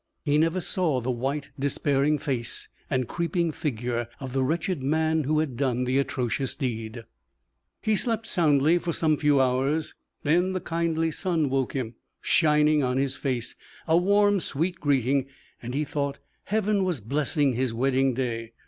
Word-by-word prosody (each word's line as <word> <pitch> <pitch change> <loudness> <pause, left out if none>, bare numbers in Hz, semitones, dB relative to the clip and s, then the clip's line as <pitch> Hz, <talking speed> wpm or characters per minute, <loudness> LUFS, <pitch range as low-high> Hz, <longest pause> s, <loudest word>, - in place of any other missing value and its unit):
He 145 0 +3
never 165 +3 +2
saw 160 -7 0
the 125 +1 -2
white, 140 +4 -3
despairing 140 +1 +1
face 125 -6 -3 0.2
and 130 -2 0
creeping 170 +1 -1
figure 120 -5 -2
of 130 -2 -6
the 135 - +1
wretched 165 +3 -1
man 160 +2 +1
who 155 +2 +1
had 155 -5 0
done 125 -1 0
the 130 +2 +1
atrocious 130 -1 -1
deed. 115 -4 -4 0.8
He 215 - +2
slept 225 +1 +1
soundly 160 -4 +3
for 170 -1 -3
some 155 -1 +2
few 145 -1 +3
hours, 135 +4 +1 0.3
then 175 +5 +2
the 185 - -1
kindly 165 -1 -1
sun 160 -5 0
woke 135 -2 0
him, 125 -4 -3 0.3
shining 150 -1 +3
on 125 -1 0
his 135 0 0
face 125 -4 -2 0.3
a 160 - +4
warm, 200 +3 +4
sweet 170 +3 -2
greeting, 135 -1 +1 0.3
and 125 +2 -5
he 150 - +1
thought 140 -1 -2 0.3
Heaven 210 -1 +1
was 180 -6 -1
blessing 140 - 0
his 125 0 0
wedding 130 +2 +1
day. 115 -3 -3
145 Hz, 160 wpm, -26 LUFS, 130-165 Hz, 0.8 s, a